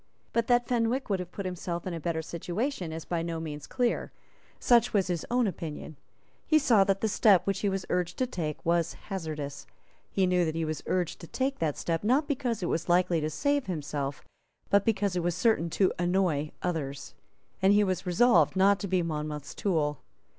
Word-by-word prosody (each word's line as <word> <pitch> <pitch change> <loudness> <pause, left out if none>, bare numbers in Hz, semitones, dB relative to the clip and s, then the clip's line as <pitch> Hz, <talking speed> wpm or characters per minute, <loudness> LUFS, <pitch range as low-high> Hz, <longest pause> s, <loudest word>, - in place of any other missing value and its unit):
But 230 -1 +1
that 240 -1 +3
Fenwick 240 0 0
would 195 - +1
have 180 -1 -6
put 200 - -6
himself 175 -1 -4
in 185 - -3
a 165 - -4
better 160 0 -2
situation 180 - -3
is 160 0 -6
by 170 -2 -1
no 165 -1 -3
means 150 -2 -6
clear. 245 -2 -1 0.5
Such 240 -1 +4
was 195 -2 +3
his 175 -3 -3
own 245 0 +2
opinion. 160 -5 -5 0.5
He 310 - +5
saw 235 -9 +5
that 195 0 +1
the 220 - +2
step 205 -3 +4
which 195 -1 0
he 200 - +1
was 195 -1 -2
urged 180 0 -1
to 255 - +1
take 160 - -4
was 170 0 +1
hazardous. 155 -7 -6 0.4
He 195 - +1
knew 180 -1 +2
that 160 -1 -1
he 165 0 -1
was 155 0 -3
urged 180 -3 -1
to 170 - -9
take 270 +6 -2
that 155 -3 -1
step, 165 +1 -2
not 260 +8 +2
because 245 -8 -1
it - - 0
was 170 +1 -2
likely 175 -2 +3
to 155 - -1
save 285 - 0
himself, 145 -5 -3 0.5
but 200 0 +4
because 200 -4 +1
it 180 - +1
was 175 0 0
certain 195 -5 +2
to 190 +3 +2
annoy 175 -4 +1
others; 145 -6 -3 0.5
and 190 +1 +5
he 205 +1 +5
was 185 -1 -2
resolved 180 - +4
not 195 +1 +4
to 200 - -3
be 185 -1 +1
Monmouth's 150 -2 -4
tool. 150 -7 0
180 Hz, 205 wpm, -29 LUFS, 165-205 Hz, 0.5 s, He